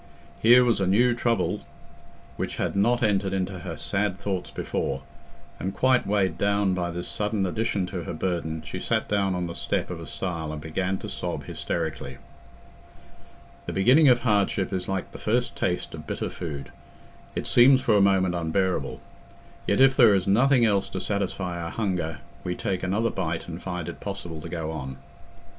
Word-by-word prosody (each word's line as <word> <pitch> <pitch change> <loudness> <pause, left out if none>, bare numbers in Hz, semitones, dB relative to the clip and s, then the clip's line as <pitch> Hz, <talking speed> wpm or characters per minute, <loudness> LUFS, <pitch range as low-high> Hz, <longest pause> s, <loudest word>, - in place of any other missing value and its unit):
Here 125 +2 +7
was 115 -4 +2
a 95 - +2
new 120 +6 +4
trouble 120 -1 0 0.7
which - - -3
had - - -2
not 120 +5 +2
entered 100 -3 +1
into 95 -1 -2
her 85 -2 -6
sad 100 +1 -1
thoughts 95 -3 -3
before, 70 0 -3 0.6
and 95 +1 -3
quite 130 0 +3
weighed 95 -4 +1
down 100 -1 +2
by 90 -1 -1
this 90 +1 -4
sudden 105 -1 -1
addition 100 +1 -1
to 90 -1 -5
her - - -4
burden, 80 -2 -2
she 75 - -6
sat - - 0
down 100 -2 +1
on 90 -1 -1
the 85 - -5
step - - -2
of - - -5
a - - -8
stile 85 -4 -3
and 75 - -5
began 90 +5 -2
to - - -7
sob - - -4
hysterically. - - -4 1.5
The - - -3
beginning 130 +10 +6
of 120 -1 +5
hardship 100 -4 +1
is 95 - -2
like 95 -1 -2
the - - -10
first 120 +3 0
taste 90 -1 -1
of 75 -2 -8
bitter - - -3
food—it 75 -6 -8
seems 130 +2 +6
for 115 -4 +3
a 100 - +5
moment 95 -2 +3
unbearable; 90 +2 -1 0.7
yet, - - +2
if 135 0 +6
there 115 -7 +7
is 95 -2 0
nothing 120 +5 +4
else 100 -3 +2
to 95 - -4
satisfy 95 -3 -2
our 85 - -4
hunger, 85 -7 -2 0.2
we 90 -1 -2
take 95 -1 -2
another 105 +5 0
bite 80 -3 -3
and 85 0 -7
find 90 -3 -4
it - - -6
possible 90 -6 -6
to 85 - -7
go 80 -2 -3
on. 65 -4 -6
95 Hz, 180 wpm, -26 LUFS, 85-105 Hz, 1.5 s, Here